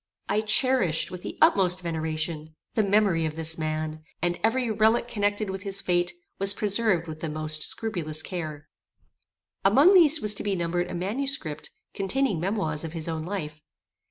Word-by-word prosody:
I 210 +2 +1
cherished, 215 - +2
with 180 -1 -7
the - - -7
utmost 185 -2 +3
veneration, 160 -1 -3 0.2
the 220 - +2
memory 200 -5 +2
of 155 - -6
this 165 0 -3
man, 155 0 -3 0.2
and 175 0 -1
every 235 +1 +1
relique 220 +2 +2
connected 205 -2 -1
with 190 0 -6
his 195 -1 0
fate 175 -1 0 0.2
was 195 +1 +7
preserved 205 -4 +1
with 155 -1 -7
the 160 - -4
most 155 0 -1
scrupulous 160 -9 -1
care. 155 -5 -6 1.0
Among 320 +8 +6
these 325 -4 +6
was 210 -5 +3
to - - -5
be 200 -1 -1
numbered 175 0 -2
a - - -5
manuscript, 195 - -2 0.2
containing 205 0 -1
memoirs 170 -4 -2
of 165 -1 -6
his 165 -1 -4
own 160 -1 -3
life. 155 -6 -5
180 Hz, 165 wpm, -26 LUFS, 160-210 Hz, 1.0 s, was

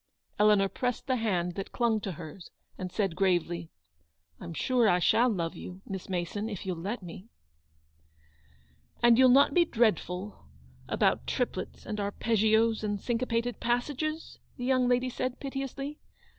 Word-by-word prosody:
Eleanor 210 -2 +5
pressed 245 +4 -3
the 260 -2 +1
hand 180 -6 0
that 195 +2 -6
clung 230 -3 +1
to 195 - -4
hers, 165 +2 -10 0.3
and 185 -1 -6
said, 195 -5 -1
gravely: 175 -3 0 0.7
"I'm 170 - -7
sure 245 0 +3
I 180 - +4
shall 235 +7 +4
love 170 -7 -2
you, 185 +2 -9
Miss 190 -1 -6
Mason, 185 +4 -2
if 205 -4 -6
you'll 180 -3 -3
let 205 +4 -4
me." 180 +5 -10 1.7
"And 240 0 +6
you'll 260 -1 +7
not 275 +3 +6
be 355 - +5
dreadful, 205 - -1 0.4
about - - +1
triplets - - -3
and 210 - -4
arpeggios, 220 +2 +2
and 205 -1 -1
cinquepated 235 0 -1
passages? 290 +6 -2 0.2
the 245 - -4
young 255 -1 +3
lady 250 +1 +2
said, 255 +1 -3
piteously. 275 +2 -5
220 Hz, 145 wpm, -29 LUFS, 185-245 Hz, 1.7 s, you'll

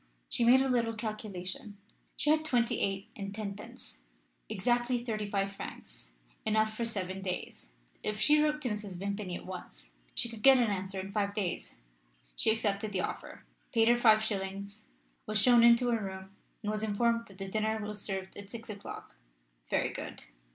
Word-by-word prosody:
She - - 0
made 255 +3 +7
a - - +1
little 235 -3 +1
calculation 210 -2 -5 0.4
she 295 - +2
had 310 0 +3
twenty 245 -6 +2
eight 195 0 -1
and 200 -1 -5
tenpence; 200 - -7 0.5
exactly 240 +4 +1
thirty 215 -3 -2
five 195 -1 0
francs - - -9 0.3
enough 215 0 +2
for 235 - -1
seven 195 -4 -3
days. 180 - -5 0.3
If 210 0 -2
she 300 +4 +5
wrote 300 0 +1
to 250 - 0
Mrs. 210 -4 -4
Vimpany 200 -1 -3
at - - -7
once - - -8 0.2
she - - +1
could 230 -2 -9
get 270 +1 +8
an 235 -4 +3
answer 190 0 -2
in 190 +1 -5
five 200 -1 0
days. 190 -5 -3 0.6
She - - +2
accepted 210 -1 0
the 185 - +1
offer, - - -5 0.3
paid 225 -1 +5
her 240 0 +5
five 220 -2 +6
shillings, 200 -1 -4 0.4
was 215 0 +2
shown 240 +2 +7
into 235 +1 +6
a 230 -2 +1
room, 190 -1 -6 0.3
and 210 - 0
was 215 0 -2
informed 230 +2 +1
that 195 - -15
the 195 0 -5
dinner 220 +2 0
was 210 -1 -4
served 190 -2 -4
at 200 -1 -9
six 230 0 -7
o'clock. 205 -1 -8 0.5
Very - - +1
good. - - -6
210 Hz, 180 wpm, -32 LUFS, 195-230 Hz, 0.6 s, get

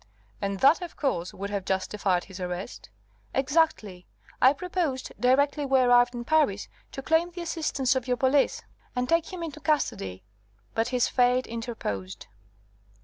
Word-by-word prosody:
"And 200 -1 -2
that, 300 +7 +5
of 350 -2 -7
course, 180 - -1
would 200 +1 -6
have 200 -2 -2
justified 190 -1 0
his 190 -1 -11
arrest?" 180 - -6 0.5
"Exactly. 265 - 0 0.3
I 260 - +7
proposed, 315 -4 -2
directly 280 +4 +3
we 270 -1 +3
arrived 245 -1 +4
in 240 - -4
Paris, 290 -11 +2 0.3
to 270 - -6
claim 325 +3 +2
the 350 0 -8
assistance 305 -6 0
of 260 -1 -2
your 250 -1 +1
police 270 +2 +2 0.3
and 250 0 0
take 335 +3 +1
him 360 -2 -5
into 310 -2 -6
custody. 185 - -1 0.5
But 225 0 0
his 250 -1 +1
fate 250 0 +2
interposed." 220 - -5
255 Hz, 150 wpm, -27 LUFS, 200-300 Hz, 0.5 s, I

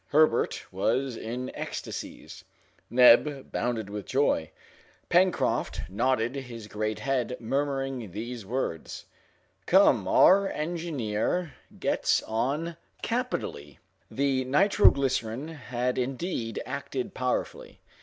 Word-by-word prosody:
Herbert 155 +2 +3
was 130 -2 0
in 125 +3 -5
ecstasies, - - -6 0.5
Neb 130 +3 +5
bounded 115 -4 -1
with 100 0 -6
joy, 130 - +1 0.6
Pencroft 180 +1 +2
nodded 120 +3 +1
his 120 -5 -7
great 105 0 -3
head, 125 0 -1
murmuring 135 -1 -2
these 115 +4 -6
words, 105 -6 -4 0.6
"Come, - - +5
our 195 +1 +6
engineer 155 -2 -2 0.2
gets - - +1
on 140 +9 -2 0.3
capitally!" 230 - -3 0.3
The 135 -1 0
nitro 195 +10 +5
glycerine 130 0 -1
had 125 -5 -2
indeed 125 - -3
acted 130 0 -4
powerfully. 125 0 -3
130 Hz, 95 wpm, -28 LUFS, 115-145 Hz, 0.6 s, our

